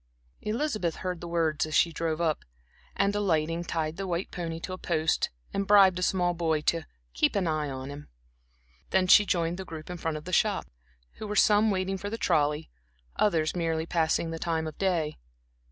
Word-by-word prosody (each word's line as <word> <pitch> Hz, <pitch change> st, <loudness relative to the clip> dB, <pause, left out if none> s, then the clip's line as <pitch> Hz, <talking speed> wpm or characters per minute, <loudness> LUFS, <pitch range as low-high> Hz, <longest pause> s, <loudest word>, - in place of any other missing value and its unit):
Elizabeth 215 Hz, -, -1 dB
heard 180 Hz, -2 st, -4 dB
the 175 Hz, -, -6 dB
words 165 Hz, -3 st, +1 dB
as 155 Hz, -, -3 dB
she 170 Hz, -, +4 dB
drove 160 Hz, 0 st, -2 dB
up, 160 Hz, -3 st, 0 dB, 0.5 s
and, 200 Hz, +1 st, +1 dB
alighting 165 Hz, -4 st, 0 dB
tied 160 Hz, -1 st, -2 dB
the 195 Hz, 0 st, -4 dB
white 175 Hz, +1 st, -2 dB
pony 165 Hz, -2 st, -4 dB
to 185 Hz, -, -6 dB
a -, -, -5 dB
post 160 Hz, -2 st, +1 dB, 0.2 s
and 195 Hz, 0 st, -1 dB
bribed 195 Hz, -3 st, +6 dB
a -, -, -4 dB
small 180 Hz, -1 st, +1 dB
boy 165 Hz, -2 st, 0 dB
to 165 Hz, +2 st, 0 dB, 0.3 s
"keep -, -, +2 dB
an 195 Hz, -2 st, +1 dB
eye" 155 Hz, -2 st, -1 dB
on 130 Hz, +1 st, -6 dB
him. 145 Hz, +1 st, -9 dB, 0.8 s
Then 190 Hz, -1 st, +3 dB
she 205 Hz, +3 st, +7 dB
joined 170 Hz, -1 st, 0 dB
the -, -, -3 dB
group 160 Hz, -1 st, -8 dB
in 180 Hz, -, -5 dB
front 160 Hz, -2 st, -2 dB
of 150 Hz, -, -10 dB
the 180 Hz, -, -6 dB
shop, 205 Hz, 0 st, +2 dB, 0.5 s
who 215 Hz, -, -6 dB
were 210 Hz, -, -3 dB
some 210 Hz, +1 st, +5 dB
waiting 190 Hz, -1 st, -1 dB
for 205 Hz, -, -4 dB
the 225 Hz, -, -4 dB
trolley, 150 Hz, -4 st, +1 dB, 0.5 s
others 165 Hz, -7 st, +2 dB
merely 165 Hz, -2 st, -1 dB
passing 165 Hz, 0 st, 0 dB
the 165 Hz, -, -5 dB
time 160 Hz, -1 st, -1 dB
of 155 Hz, -1 st, -6 dB
day. 170 Hz, -, 0 dB
170 Hz, 200 wpm, -28 LUFS, 160-190 Hz, 0.8 s, she